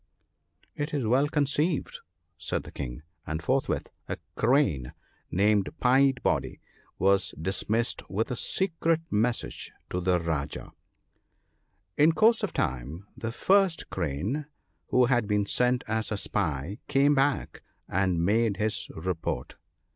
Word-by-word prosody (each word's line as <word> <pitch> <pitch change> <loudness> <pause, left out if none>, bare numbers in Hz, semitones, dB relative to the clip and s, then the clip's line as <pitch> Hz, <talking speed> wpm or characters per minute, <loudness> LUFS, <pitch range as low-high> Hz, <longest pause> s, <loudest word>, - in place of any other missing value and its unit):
' - - -49 0.3
It 150 +1 -3
is 135 -5 0
well 130 +6 +3
conceived/ 150 +2 0 0.4
said - - -3
the - - -11
King. 65 +1 -6 0.2
And 80 0 -2
forthwith 130 +11 -1 0.2
a - - -2 0.2
Crane, 115 - +2 0.4
named 100 +1 +2
Pied 135 +1 +4
body, - - 0 0.4
was 95 +1 +2
dismissed 105 +6 -1
with 110 +6 -1
a - - -1
secret 165 +1 0
message 115 +3 -1 0.2
to 90 - -1
that 90 -2 +1
Rajah. 75 -4 -3 0.7
" 90 -1 -46
In 160 +2 +6
course 225 +5 +4
of 210 - -1
time 70 +6 -3
the 115 0 -4
first 190 +6 +2
Crane, 95 - -2 0.4
who 125 0 +4
had 120 -3 +2
been 105 -1 +1
sent 125 +4 +2
as 110 0 -1
a 105 - 0
spy, 85 -2 -2
came 140 +1 +4
back, 140 0 0 0.3
and 90 -2 +1
made 110 +1 +2
his 110 0 -1
report. 80 -6 -3
110 Hz, 135 wpm, -28 LUFS, 90-140 Hz, 0.7 s, In